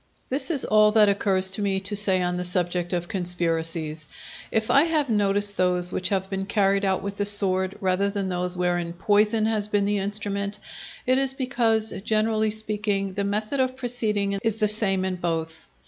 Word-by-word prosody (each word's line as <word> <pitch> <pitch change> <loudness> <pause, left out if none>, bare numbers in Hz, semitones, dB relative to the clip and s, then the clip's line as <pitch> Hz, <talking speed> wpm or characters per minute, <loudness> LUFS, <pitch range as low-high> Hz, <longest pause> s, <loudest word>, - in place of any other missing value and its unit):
This 270 +6 -1
is 300 -6 +1
all 215 0 +4
that 215 -2 +6
occurs 190 -2 +1
to 200 - +1
me 195 -1 0
to 200 +2 -4
say 190 -3 +3
on 180 0 -1
the 180 - -3
subject 175 -1 -1
of 175 -1 -2
conspiracies. 165 -4 -2 0.4
If 220 0 0
I 280 +3 +5
have 305 -6 0
noticed 205 -1 +1
those 180 -1 +1
which 185 - -1
have 190 -1 -1
been 195 0 -4
carried 200 -1 +1
out 190 -1 0
with 200 0 -5
the 205 - 0
sword 190 -2 +3
rather 190 +1 0
than 200 -1 -3
those 180 0 -2
wherein 175 -1 -1
poison 210 +4 +2
has 215 -2 +1
been 205 -1 0
the 205 0 0
instrument, 200 0 -3 0.5
it 255 +1 +3
is 270 -1 0
because, 230 -5 0
generally 215 0 +1
speaking, 210 -2 -2
the 200 +1 -2
method 215 +6 -2
of 255 0 0
proceeding 215 -6 -2
is 225 -2 0
the 215 -1 +1
same 195 -3 0
in 185 -1 -2
both. 165 -2 -4
200 Hz, 190 wpm, -24 LUFS, 185-215 Hz, 0.5 s, that